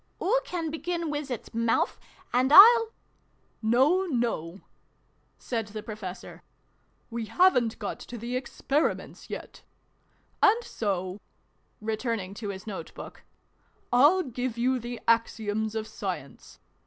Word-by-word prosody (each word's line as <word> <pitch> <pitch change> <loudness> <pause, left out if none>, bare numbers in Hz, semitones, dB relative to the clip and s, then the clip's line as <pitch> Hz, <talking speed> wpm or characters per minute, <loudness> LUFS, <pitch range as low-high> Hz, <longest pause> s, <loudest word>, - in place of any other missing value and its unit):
" - - -42
Oo 460 +7 +2
can 330 -3 -4
begin 335 0 -3
wiz 290 -1 -4
its 245 -4 -6
mouf, 230 0 +1 0.3
and 255 +2 +2
I'll 455 +6 +9 0.4
" - - -41 0.2
No, 355 +9 +4
no! 230 - -2 0.4
" - - -41 0.3
said 225 -4 -3
the 215 0 -7
Professor. 210 -4 -8 0.3
" - - -41
We 230 -1 -3
haven't 240 - +3
got 205 - -5
to 245 - -8
the 235 +3 -4
Experiments 275 +3 -2
yet. - - -8 0.8
And 455 +4 +5
so," 190 - -3 0.6
return 225 +1 -2
ing 190 0 -7
to 210 - -3
his 190 -1 -7
note 205 -3 -7
book, - - -10 0.4
" - - -18
I'll 295 +10 +6
give 250 -3 -4
you 255 +2 +1
the 240 0 -6
Axioms 220 -1 +1
of 220 -1 -2
Science. 180 - -7
235 Hz, 140 wpm, -27 LUFS, 215-295 Hz, 0.8 s, I'll